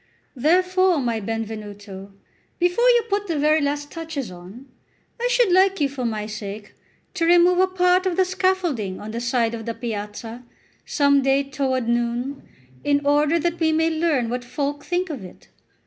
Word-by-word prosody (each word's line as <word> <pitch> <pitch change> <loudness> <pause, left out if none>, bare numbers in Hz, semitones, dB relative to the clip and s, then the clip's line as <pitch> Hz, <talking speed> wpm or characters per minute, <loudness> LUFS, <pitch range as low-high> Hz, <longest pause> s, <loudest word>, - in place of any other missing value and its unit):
Therefore, 365 +5 +3
my 235 -5 -1
Benvenuto, 205 -2 -6 0.5
before 355 +8 +3
you 480 -1 +4
put 410 -1 -1
the 330 -3 -1
very 305 +2 +3
last 290 0 -2
touches 320 - -5
on, 185 +9 -12 0.6
I 485 - +2
should - - +3
like 380 +1 +4
you, 290 - +3
for 270 -2 -5
my 215 -2 -2
sake, 210 -1 -7 0.4
to 360 -3 -2
remove 350 +1 +5
a 375 - +5
part 365 0 +2
of 355 - -1
the 375 - +4
scaffolding 360 - -1
on 215 - -7
the 230 +1 -4
side 235 -1 0
of 225 0 -6
the 230 - -3
piazza, 225 +1 -6 0.4
some 280 -1 +3
day 270 +1 +2
toward 265 -3 -2
noon, 240 +3 -1 0.4
in 285 0 +1
order 295 +3 +3
that 340 +1 -1
we 320 -1 +2
may 320 +1 +2
learn 315 -7 +1
what 245 0 -3
folk 285 +4 -3
think 355 0 -2
of 265 -10 -6
it. 180 - -14
280 Hz, 175 wpm, -22 LUFS, 230-350 Hz, 0.6 s, remove